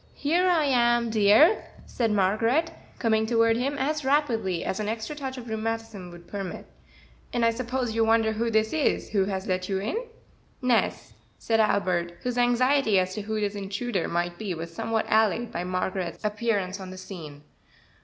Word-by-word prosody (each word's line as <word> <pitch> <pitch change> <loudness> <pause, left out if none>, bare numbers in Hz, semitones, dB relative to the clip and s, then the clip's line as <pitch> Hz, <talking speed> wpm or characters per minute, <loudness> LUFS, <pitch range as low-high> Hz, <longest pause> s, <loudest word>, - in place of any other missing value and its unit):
"Here 350 +5 +2
I 330 -4 +3
am, 240 -3 +2
dear," 220 - +5 0.2
said 235 -2 -1
Margaret, 225 - +2 0.3
coming 220 -2 +1
toward 230 -1 +3
him 275 +4 -1
as 300 +2 -1
rapidly 240 - +1
as 190 - -2
an 210 - -2
extra 225 +6 -4
touch 265 -3 -5
of 245 -1 -8
rheumatism 220 -3 -4
would 175 0 -13
permit, 195 -3 -6 0.7
"and 240 -1 +1
I 230 - +4
suppose 245 0 -2
you 225 0 +2
wonder 225 0 +3
who 230 +2 -1
this 220 0 +1
is 315 -3 0
who 195 -3 +2
has 190 -1 -3
let 185 0 -2
you 195 - 0
in?" 210 - -2 0.6
"Nes," 250 -3 0 0.2
said 225 -1 0
Albert, 180 -5 +1
whose 245 0 -1
anxiety 245 -2 +3
as 185 0 +1
to 210 - -4
who 215 +1 -3
this 205 -1 -1
intruder 200 0 -3
might 175 0 -2
be 200 -5 -3
was 165 +1 -7
somewhat 220 +5 -1
allayed 220 +1 +2
by 170 - -3
Margaret's 185 +1 -3
appearance 210 -3 -1
on 190 -1 -8
the 185 - -9
scene. 165 -6 -9
220 Hz, 175 wpm, -26 LUFS, 190-240 Hz, 0.7 s, dear